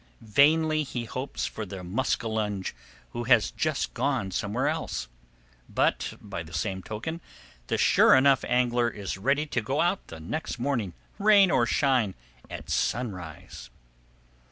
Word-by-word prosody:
Vainly 155 +7 +3
he 125 -5 -4
hopes 130 +4 -4
for 110 - -5
the 95 -2 -7
muskellunge 105 -1 -1 0.4
who 120 0 -4
has 115 -3 +4
just 155 -3 -1
gone 120 -9 -1
somewhere 105 +9 -1
else, 155 - -2 0.6
but, - - 0
by 100 -5 -6
the 80 -1 -9
same 95 +4 -2
token, 145 - -5 0.5
the - - 0
sure - - +6
enough 135 0 +4
angler 120 -1 +2
is 100 -3 -5
ready 140 +8 +1
to 130 -5 -1
go 135 +7 -2
out 175 +4 0
next 105 - -4
morning, 120 -8 -1 0.3
rain 200 -3 +6
or 120 -2 +3
shine, 125 -5 +2 0.3
at - - -8
sunrise. 90 - -3
120 Hz, 135 wpm, -27 LUFS, 100-140 Hz, 0.6 s, sure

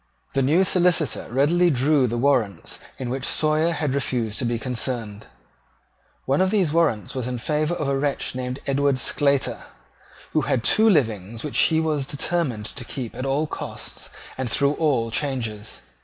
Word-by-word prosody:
The 135 - +2
new 155 +8 +4
Solicitor 180 -5 +1
readily 165 +7 +3
drew 140 -1 +3
the 120 +1 -2
warrants 120 -6 +1 0.2
in 125 -2 -4
which 130 0 -3
Sawyer 155 +3 +2
had 150 -5 -1
refused 120 -5 -1
to 130 - -1
be 120 0 0
concerned. 115 -3 -3 1.0
One 140 +6 +2
of 190 - +3
these 190 -7 +1
warrants 150 - +1
was 130 -2 -3
in 125 -1 -3
favour 150 +6 0
of 150 - -2
a 140 - +1
wretch 140 0 -1
named 125 +1 -4
Edward 140 0 +1
Sclater, 140 +2 +1 0.7
who - - +2
had 120 - 0
two 220 - +5
livings 115 - 0
which 150 - -1
he 160 -1 +4
was 150 -4 -1
determined 145 -7 -1
to 125 +4 -5
keep 120 -1 -6
at 130 - -4
all 140 +3 +1
costs - - -6 0.3
and 130 -2 -2
through 140 +4 +2
all 135 -8 +1
changes. 110 - -2
135 Hz, 170 wpm, -23 LUFS, 120-155 Hz, 1.0 s, two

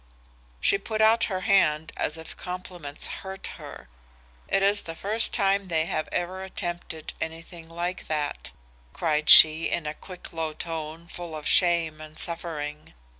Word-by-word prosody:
"She 195 - +3
put 215 +2 -4
out 220 +1 +5
her 185 -3 -3
hand 160 -5 +2
as 150 - -2
if 160 - -9
compliments 180 -5 -6 0.2
hurt 190 0 -7
her. - - -11 0.6
'It 195 - +1
is 200 +1 +4
the 165 - -7
first 215 +6 +2
time 200 -1 +2
they 160 -3 +1
have 155 - -2
ever 185 +2 -2
attempted 175 -4 -5
anything 165 +1 -7
like 175 +2 -4
that,' 150 -2 -2 0.4
cried 155 -2 0
she 160 +1 +9
in 165 - -2
a 150 - -3
quick 180 +3 -11
low 160 -1 -3
tone 165 0 -6
full 175 -2 -8
of 150 - -6
shame 170 -3 +3
and 155 0 -11
suffering. 150 - -5
170 Hz, 155 wpm, -26 LUFS, 155-185 Hz, 0.6 s, she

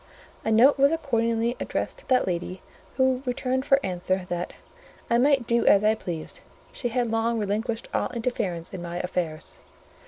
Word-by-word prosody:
A 220 - 0
note 255 +6 +6
was 280 +2 +5
accordingly 235 -6 0
addressed - - -3
to - - -10
that 255 -1 +3
lady, 180 +1 -3 0.3
who 260 -1 +2
returned 260 +1 -1
for 275 -1 +5
answer, 185 0 -1
that 175 0 -3 0.6
"I 235 - +4
might 270 -1 +3
do 235 0 +2
as 200 0 +6
I 215 +1 +4
pleased: 170 -7 -6 0.3
she 245 - -2
had 240 -1 0
long 225 +1 +1
relinquished 220 +3 -2
all - - 0
interference 220 -9 -3
in 185 - -5
my 175 0 -5
affairs." 175 -3 -4
230 Hz, 165 wpm, -26 LUFS, 185-250 Hz, 0.6 s, note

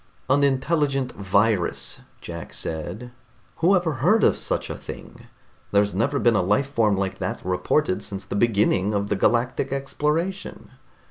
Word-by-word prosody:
"An 140 +1 +4
intelligent 135 -1 +1
virus?" 100 0 0 0.2
Jack - - -7
said. 105 +10 -5 0.5
"Who 180 +4 +4
ever 175 -4 +1
heard 210 +8 +4
of - - +5
such - - -3
a - - -4
thing? - - -10 0.4
There's 100 0 +2
never 115 +9 0
been 120 -4 +3
a 105 - +3
life 105 +9 +1
form 105 -5 +2
like 95 0 -2
that 90 -1 -4
reported 95 +4 +1
since 100 -1 -6
the 100 - -5
beginning 105 -2 +2
of 100 0 -1
the 105 - +1
galactic 120 +6 +1
exploration." 150 +7 -2
115 Hz, 150 wpm, -24 LUFS, 100-140 Hz, 0.5 s, of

